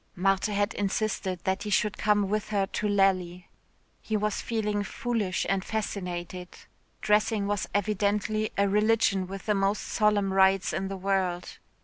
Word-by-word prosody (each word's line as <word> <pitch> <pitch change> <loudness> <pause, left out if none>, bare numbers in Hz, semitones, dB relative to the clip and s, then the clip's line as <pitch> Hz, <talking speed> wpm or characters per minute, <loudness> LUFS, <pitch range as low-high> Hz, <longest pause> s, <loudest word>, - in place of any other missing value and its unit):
Marthe 195 +2 +2
had 205 +1 0
insisted 195 -3 -2
that 190 +1 0
he 210 - -4
should 210 0 +1
come 205 -2 +2
with 215 +1 -2
her 200 -2 +1
to 210 +2 -3
Lally. 185 -3 +1 0.5
He 220 - -1
was 210 0 -1
feeling 210 -3 -1
foolish 215 -4 -2
and 195 0 0
fascinated 180 -4 -4 0.5
dressing 210 0 +2
was 205 0 -2
evidently 210 +1 0
a 200 0 +3
religion 210 -2 +2
with 195 0 -8
the 210 - +2
most 195 +1 0
solemn 205 -2 +1
rites 190 0 +3
in 190 - -2
the 195 0 -5
world. 185 -2 -1
200 Hz, 150 wpm, -27 LUFS, 190-210 Hz, 0.5 s, a